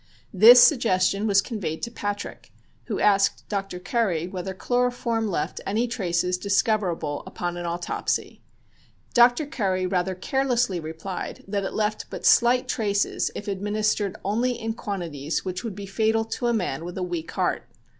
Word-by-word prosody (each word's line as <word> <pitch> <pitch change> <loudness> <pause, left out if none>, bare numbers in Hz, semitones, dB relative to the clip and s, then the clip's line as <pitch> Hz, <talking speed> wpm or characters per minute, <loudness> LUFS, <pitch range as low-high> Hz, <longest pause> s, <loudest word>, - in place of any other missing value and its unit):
This 225 +6 +9
suggestion 215 -6 +3
was 200 -1 +4
conveyed 180 -10 -4
to 235 - -3
Patrick, 205 -3 -5 0.3
who - - -3
asked 200 -1 +2
Dr. 195 -3 -3
Curry 180 -4 0
whether 185 +1 -5
chloroform 245 0 0
left 170 -7 -3
any 220 +5 0
traces 180 -5 -1
discoverable 190 -7 0
upon 175 0 -4
an 175 0 -4
autopsy. 170 +1 -3 0.7
Dr. 245 +4 +5
Curry 195 -10 -1
rather 185 0 0
carelessly 245 -2 0
replied 160 +4 -6
that 200 0 -2
it - - -5
left 215 0 -1
but - - -7
slight 245 +1 +5
traces 205 -3 0
if 205 - -6
administered 205 0 -1
only 235 +5 +1
in 225 0 -2
the 225 - -8
quantities 165 -9 -4
which 185 -1 -4
would 225 -5 -5
be 200 0 -7
fatal 220 +3 +1
to 235 +2 -3
a - - +3
man 165 -9 -2
with 175 +2 -7
a 185 - -2
weak 175 -2 -4
heart. - - -1
200 Hz, 155 wpm, -25 LUFS, 180-225 Hz, 0.7 s, This